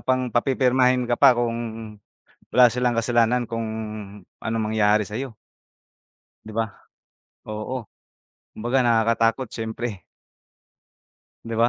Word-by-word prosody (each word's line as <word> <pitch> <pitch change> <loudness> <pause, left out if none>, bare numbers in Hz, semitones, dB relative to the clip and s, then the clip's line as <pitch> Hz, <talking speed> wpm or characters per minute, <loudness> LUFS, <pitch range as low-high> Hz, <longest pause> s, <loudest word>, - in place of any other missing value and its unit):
pang, 130 -2 0
papipirmahin 125 0 +3
ka 120 0 -1
pa 135 -3 +7
kung 120 -1 0 1.0
wala 125 0 +7
silang 125 +1 0
kasalanan 120 +1 +1
kung 115 -1 -3 0.7
anong 110 -1 -2
mangyari 105 -1 +3
sa'yo. 115 +5 -5 1.1
'Di 110 - -9
ba? 115 0 +1 0.8
Oo, 110 +2 -5 0.7
kumbaga 120 +4 0
nakakatakot 115 +1 +2
siyempre. 110 -2 -5 1.4
'Di 115 - -4
ba? 115 +1 +5
120 Hz, 105 wpm, -23 LUFS, 110-125 Hz, 1.4 s, pa